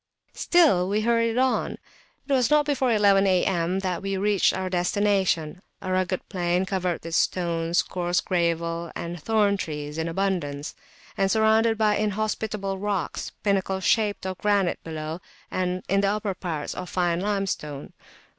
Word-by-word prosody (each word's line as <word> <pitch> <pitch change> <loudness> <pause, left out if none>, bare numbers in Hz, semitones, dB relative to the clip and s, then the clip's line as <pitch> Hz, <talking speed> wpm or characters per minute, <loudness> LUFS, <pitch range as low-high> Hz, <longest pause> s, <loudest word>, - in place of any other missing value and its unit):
Still 285 - +3
we 210 +2 +1
hurried 230 0 +1
on. 260 0 +1 0.5
It 280 - 0
was 250 -4 +3
not 300 0 +4
before 265 -4 +1
eleven 200 -2 +4
A.M. 185 0 +1
that 185 -2 -2
we 195 0 -2
reached 200 0 +3
our 190 0 -3
destination, 185 -2 0 0.2
a 185 - -5
rugged 185 0 -1
plain 180 -1 0
covered 185 -3 -2
with 165 0 -6
stones, 170 -1 +1
coarse 175 0 -1
gravel, 170 -1 -1
and 170 -1 -5
thorn 210 0 +2
trees 150 -3 -5
in 160 - -1
abundance; 165 -6 -2 0.5
and 195 0 +3
surrounded 220 +1 +3
by 210 -1 +2
inhospitable 210 -1 -2
rocks, 200 -5 -3
pinnacle 195 -2 +1
shaped, 205 0 +1
of 185 -1 -4
granite 200 -3 +1
below, 160 +1 -5 0.3
and 185 0 -1
in 195 +1 +2
the 200 - +2
upper 205 -1 -1
parts 165 -5 -4
fine 175 -2 0
limestone. 195 -8 -3
190 Hz, 145 wpm, -25 LUFS, 175-210 Hz, 0.5 s, not